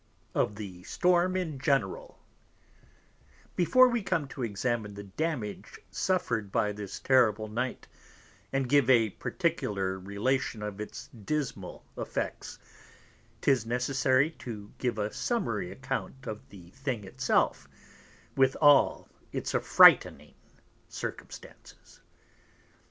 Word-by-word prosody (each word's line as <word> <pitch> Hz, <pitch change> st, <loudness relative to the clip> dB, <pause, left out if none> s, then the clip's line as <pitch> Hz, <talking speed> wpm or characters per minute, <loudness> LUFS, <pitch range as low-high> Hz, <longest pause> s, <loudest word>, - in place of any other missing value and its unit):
CHAPTER -, -, -38 dB
III -, -, -1 dB
Of 105 Hz, -, -1 dB
the 95 Hz, -4 st, -8 dB
Storm 180 Hz, +1 st, +2 dB
in 160 Hz, -7 st, -3 dB
General 165 Hz, -, -1 dB, 1.4 s
Before 255 Hz, +9 st, +6 dB
we 240 Hz, -2 st, 0 dB
come 170 Hz, -7 st, -1 dB
to 135 Hz, -, -8 dB
examine 110 Hz, -1 st, -2 dB
the 100 Hz, -, -7 dB
Damage 115 Hz, 0 st, -4 dB
suffer'd 115 Hz, -, -1 dB
by 105 Hz, -, +1 dB
this 105 Hz, -1 st, -7 dB
terrible 110 Hz, -5 st, +3 dB
Night, 125 Hz, +4 st, -4 dB, 0.6 s
and 135 Hz, -1 st, 0 dB
give 140 Hz, -1 st, +3 dB
a 115 Hz, -5 st, +5 dB
particular 95 Hz, -1 st, -2 dB
Relation 105 Hz, +4 st, -1 dB
of 105 Hz, 0 st, -5 dB
its 105 Hz, -, -7 dB
dismal 115 Hz, -4 st, -4 dB
Effects; -, -, -4 dB, 0.8 s
'tis 130 Hz, -5 st, +2 dB
necessary 130 Hz, +4 st, +2 dB
to 105 Hz, -4 st, -8 dB
give 120 Hz, -3 st, -1 dB
a 105 Hz, 0 st, -2 dB
summary 220 Hz, -6 st, -2 dB
Account 130 Hz, 0 st, -5 dB
of 110 Hz, 0 st, -7 dB
the 90 Hz, -3 st, -14 dB
thing 130 Hz, -4 st, -4 dB
it 95 Hz, -, -12 dB
self, -, -, +1 dB, 0.7 s
with 135 Hz, 0 st, +3 dB
all 145 Hz, -2 st, +5 dB, 0.2 s
its -, -, -3 dB
affrightning -, -, +5 dB, 0.6 s
Circumstances. -, -, -9 dB
125 Hz, 120 wpm, -29 LUFS, 105-145 Hz, 1.4 s, Before